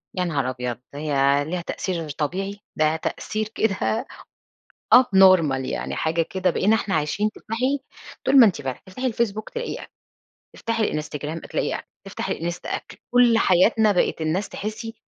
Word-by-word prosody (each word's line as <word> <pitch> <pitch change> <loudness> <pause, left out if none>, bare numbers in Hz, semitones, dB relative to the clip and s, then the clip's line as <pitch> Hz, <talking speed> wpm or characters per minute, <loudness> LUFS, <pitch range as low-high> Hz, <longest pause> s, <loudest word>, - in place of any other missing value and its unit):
يا 180 - 0
نهار 140 -6 -1
أبيض، 125 -1 -3 0.2
ده 145 - -7
هي 140 -1 +2
ليها 175 +3 -3
تأثير 170 -2 -4
طبيعي؟! 185 +8 -3 0.2
ده 155 0 +2
تأثير 215 +6 -3
كده 220 +3 0 0.9
up 255 - +9
normal 165 -9 +5
يعني - - -3
حاجة 165 +1 +1
كده 185 +2 0
بقينا 210 +6 +3
إحنا 205 -4 -2
عايشين 180 +8 0
تفتحي 255 +6 -2 0.4
طول 270 +1 +5
ما 235 - +9
أنتِ 180 -8 0
فاتحة، 130 -2 -5
تفتحي 250 +7 -3
الFacebook 215 -2 -2
تلاقي 475 0 -3
أكل، - - -11 0.6
تفتحي 230 -1 -1
الInstagram 150 +1 -5
تلاقي - - -1
أكل، - - -8 0.2
تفتحي - - -4
الإنستا 175 +2 -5
أكل. - - -5
كل 245 -2 +5
حياتنا 215 +3 +4
بقت 180 -3 +1
الناس 170 +6 -1
تحسّي 220 +2 -6
185 Hz, 160 wpm, -23 LUFS, 155-220 Hz, 0.9 s, up